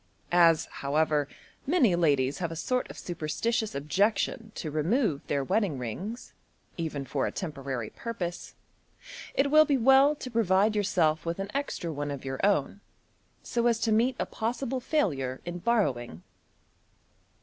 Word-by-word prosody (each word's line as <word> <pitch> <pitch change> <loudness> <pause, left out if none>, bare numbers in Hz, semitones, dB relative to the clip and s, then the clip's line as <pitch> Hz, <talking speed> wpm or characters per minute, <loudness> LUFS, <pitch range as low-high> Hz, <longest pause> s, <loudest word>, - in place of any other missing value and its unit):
As, 170 -2 +5
however, 150 0 0 0.4
many 270 - +4
ladies 140 -5 +2
have 170 -2 -2
a - - -5
sort 250 +10 -1
of - - -10
superstitious 180 +7 -2
objection 200 +9 0
to 155 - -4
remove 160 - +1
their 140 -1 0
wedding 190 0 0
rings, 185 - -6 0.4
even 155 -5 -4
for 135 0 -1
a - - -3
temporary 135 - -5
purpose, 185 -7 -5 0.8
it 280 +1 +2
will 310 +1 +8
be 285 -3 +2
well 270 +4 +5
to 255 -3 -8
provide 210 -1 +3
yourself 170 -7 +1
with 170 0 -3
an 195 +1 -5
extra 270 - -3
one 145 0 -3
of 140 -1 -6
your 135 0 -4
own, 200 -1 +1 0.6
so 235 0 0
as 230 -1 +2
to 225 - +1
meet 235 +4 +3
a - - -1
possible 245 +3 -3
failure 140 - -1
in 175 0 -5
borrowing. 130 - 0
175 Hz, 150 wpm, -28 LUFS, 145-230 Hz, 0.8 s, will